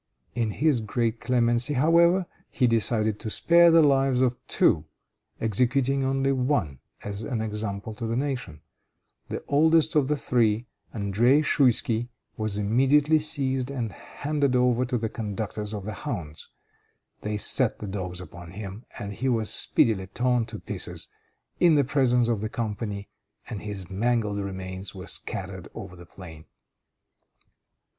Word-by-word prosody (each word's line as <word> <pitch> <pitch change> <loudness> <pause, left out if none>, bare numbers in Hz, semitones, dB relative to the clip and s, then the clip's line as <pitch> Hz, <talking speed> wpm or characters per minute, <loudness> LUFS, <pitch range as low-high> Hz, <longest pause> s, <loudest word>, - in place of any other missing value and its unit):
In 115 -2 -1
his 145 +3 +1
great 115 +1 -1
clemency, 120 +2 +1
however, 170 +6 +4 0.2
he 130 - +1
decided 110 -2 +2
to 110 - -4
spare 170 +8 +6
the 165 -1 +6
lives 135 -3 +3
of 125 -1 +2
two, 80 -1 +2 0.5
executing 130 +5 +1
only 135 +1 +1
one 125 - 0 0.2
as 100 0 -5
an 115 0 -3
example 105 -1 -3
to 115 +2 -5
the 115 - -1
nation. 125 - -3 0.7
The - - -5
oldest 160 +2 +3
of 150 -3 +3
the 150 +1 0
three, 115 -3 +1 0.3
André 115 +8 +2
Schouisky, 120 -3 +2 0.3
was 110 -2 -2
immediately 135 +9 +3
seized 135 -4 -1
and 120 -6 -3
handed 145 +1 -2
over 125 0 +2
to 125 0 -1
the 115 -1 -2
conductors 105 -1 -5
of 105 -3 -6
the 110 - -4
hounds. 85 - -6 0.7
They 105 0 -2
set - - +3
the - - -7
dogs 90 -3 -4
upon 85 -1 -10
him, 100 +3 -8
and 100 0 -5
he 130 +6 -2
was 115 -3 +1
speedily 95 -5 +2
torn 120 +2 0
to - - -6
pieces - - -4 0.5
in 170 -3 +5
the 145 - +4
presence 125 -3 +2
of 115 -4 0
the 110 - -3
company, 105 -3 -4 0.4
and 100 - -6
his 100 -4 -6
mangled 105 +1 0
remains 95 0 -5
were 95 - -8
scattered - - -4
over 90 - -8
the 85 -1 -13
plain. 80 -4 -12
115 Hz, 150 wpm, -26 LUFS, 105-135 Hz, 0.7 s, spare